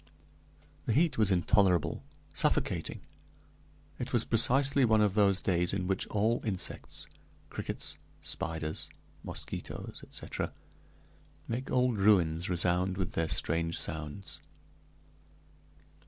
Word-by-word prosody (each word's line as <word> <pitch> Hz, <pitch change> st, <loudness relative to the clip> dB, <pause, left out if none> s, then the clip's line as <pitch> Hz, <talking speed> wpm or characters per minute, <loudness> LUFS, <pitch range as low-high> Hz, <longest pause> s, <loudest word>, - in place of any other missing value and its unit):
The -, -, +2 dB
heat 155 Hz, 0 st, +3 dB
was 105 Hz, -3 st, +5 dB
intolerable, 95 Hz, -2 st, +3 dB, 0.3 s
suffocating; -, -, 0 dB, 1.0 s
it -, -, -3 dB
was -, -, +2 dB
precisely 135 Hz, +4 st, +3 dB
one 110 Hz, -2 st, +5 dB
of 105 Hz, -2 st, +3 dB
those 100 Hz, -2 st, +3 dB
days 90 Hz, 0 st, +1 dB
in 95 Hz, -2 st, -1 dB
which 95 Hz, +1 st, -1 dB
all 110 Hz, +3 st, +1 dB
insects 100 Hz, -5 st, -3 dB, 0.5 s
crickets, -, -, -5 dB, 0.2 s
spiders, 80 Hz, -1 st, -4 dB, 0.3 s
mosquitoes, -, -, -6 dB
etc. -, -, -5 dB, 0.9 s
make 125 Hz, +4 st, -3 dB
old 125 Hz, -4 st, +2 dB
ruins 90 Hz, -5 st, +3 dB
resound 90 Hz, +1 st, +1 dB
with 95 Hz, -3 st, -2 dB
their 80 Hz, 0 st, 0 dB
strange 85 Hz, +2 st, 0 dB
sounds. 80 Hz, +5 st, -4 dB
95 Hz, 105 wpm, -31 LUFS, 85-110 Hz, 1.0 s, was